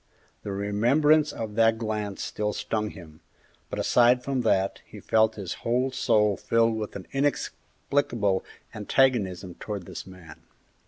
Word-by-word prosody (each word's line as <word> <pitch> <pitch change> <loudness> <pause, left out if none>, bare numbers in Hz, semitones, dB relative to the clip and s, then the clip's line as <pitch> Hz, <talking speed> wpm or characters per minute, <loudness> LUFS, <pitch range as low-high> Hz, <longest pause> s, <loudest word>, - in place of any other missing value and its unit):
The 100 - -5
remembrance 125 +10 +3
of 110 -2 -5
that 115 0 +4
glance 105 -3 -3
still 105 0 -2
stung 105 -1 -2
him, 80 -6 -13 0.5
but - - -5
aside 125 +1 +4
from 135 -2 -1
that, 95 -4 +1
he - - -12
felt 110 0 +2
his 95 -4 -5
whole 125 +3 0
soul 105 -5 +2
filled 115 0 +2
with 110 -1 -5
an 95 - -7
inexplicable 135 -6 -1 0.3
antagonism 105 -5 +1
towards 100 -4 -5
this - - -8
man. 90 -4 -13
110 Hz, 140 wpm, -26 LUFS, 100-120 Hz, 0.5 s, that